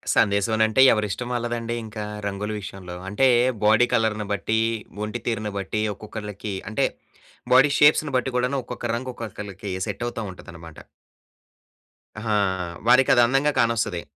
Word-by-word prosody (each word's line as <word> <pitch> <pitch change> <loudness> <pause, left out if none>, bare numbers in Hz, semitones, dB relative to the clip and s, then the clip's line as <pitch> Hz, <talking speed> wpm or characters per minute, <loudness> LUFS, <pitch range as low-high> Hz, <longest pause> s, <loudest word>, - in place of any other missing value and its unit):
సందేశవనంటే 110 +3 +3
ఎవరిష్టం 105 +2 -2
వాళ్ళదండీ 120 -1 -2
ఇంకా 110 -1 -6 0.2
రంగుల 100 +1 -4
విషయంలో. 95 -2 -8
అంటే, 120 +7 +3 0.4
బాడీ 110 +3 +5
కలర్‌ని 110 -2 +1
బట్టీ, 110 +3 0 0.5
ఒంటి 110 +3 -5
తీరును 110 -3 -2
బట్టీ, 100 +2 -2
ఒక్కొక్కళ్ళకి 105 -1 -7 0.2
అంటే, 110 - +1 0.7
బాడీ 135 +3 +6
షేప్స్‌ని 150 -1 +4
బట్టి 130 +1 -1
గూడాను, 125 +2 0
ఒక్కొక్క 120 0 -7
రంగు 130 +2 -4
ఒక్కొక్కళ్ళకి 105 -3 -7 0.2
సెట్టవుతా 120 -1 -4
ఉంటదనమాట. 85 -3 -12 1.4
అహా! 110 -1 -1 0.5
వారికదందంగా 130 +2 +5
కానొస్తది. 115 -6 +1
110 Hz, 115 wpm, -24 LUFS, 105-120 Hz, 1.4 s, బాడీ